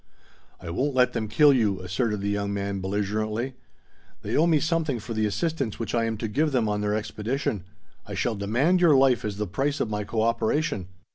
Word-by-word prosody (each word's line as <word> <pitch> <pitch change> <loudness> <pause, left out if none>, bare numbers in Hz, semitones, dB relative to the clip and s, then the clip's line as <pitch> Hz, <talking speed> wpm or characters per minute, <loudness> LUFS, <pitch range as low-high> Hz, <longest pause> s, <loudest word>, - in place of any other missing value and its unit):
"I 85 - -7
won't 135 +10 -1
let 125 -1 +3
them 110 -2 -2
kill 145 +6 +5
you!" 105 -7 +1
asserted 105 +3 -1
the 100 - -1
young 100 0 -1
man 100 -1 -2
belligerently. 105 +5 -2 0.7
"They - - -2
owe 160 +3 +4
me 160 -3 +4
something 160 -5 0
for 115 +2 -6
the 110 -1 +1
assistance 135 - -2
which 115 - -4
I 115 -1 +2
am 115 -1 -2
to 110 - -3
give 150 +8 +1
them 120 -5 +1
on 105 0 -1
their 105 0 0
expedition. 110 0 -2 0.4
I - - -5
shall 120 - 0
demand 120 - +1
your 165 -5 +6
life 130 -2 +4
as 105 -2 -3
the 105 - -1
price 135 +10 -1
of 110 - -1
my 105 0 -1
cooperation. 115 - 0
110 Hz, 205 wpm, -26 LUFS, 105-135 Hz, 0.7 s, your